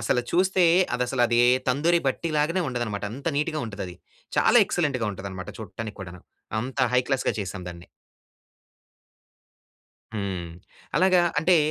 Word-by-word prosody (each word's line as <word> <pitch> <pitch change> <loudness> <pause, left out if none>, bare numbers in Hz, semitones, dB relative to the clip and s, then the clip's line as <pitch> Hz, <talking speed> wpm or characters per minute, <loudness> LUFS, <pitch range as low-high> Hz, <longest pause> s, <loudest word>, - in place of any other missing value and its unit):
అసల 120 +1 +1
చూస్తే 185 +1 +2 0.3
అదసలది 120 -1 +2 0.3
తందూరి 155 +7 +3
బట్టిలాగానే 155 +5 0
ఉండదనమాట 120 -5 -3
అంత 140 +7 -4
నీట్‌గా 155 0 -1
ఉంటదది. 100 -4 -6 0.4
చాలా - - +6
ఎక్సలెంట్‌గా 140 -9 0
ఉంటదనమాట 95 -1 -7
చూట్టానిక్కూడాను 100 -4 -8 0.4
అంత 130 +3 -4
హై 125 - +4
క్లాస్‌గా 135 -4 0
చేసాం 95 -1 -5
దాన్ని. 85 -1 -10 2.3
హ్మ్. 100 -5 -3 0.5
అలాగా 185 +2 +5 0.2
అంటే 175 +3 +4
125 Hz, 110 wpm, -25 LUFS, 100-155 Hz, 2.3 s, చాలా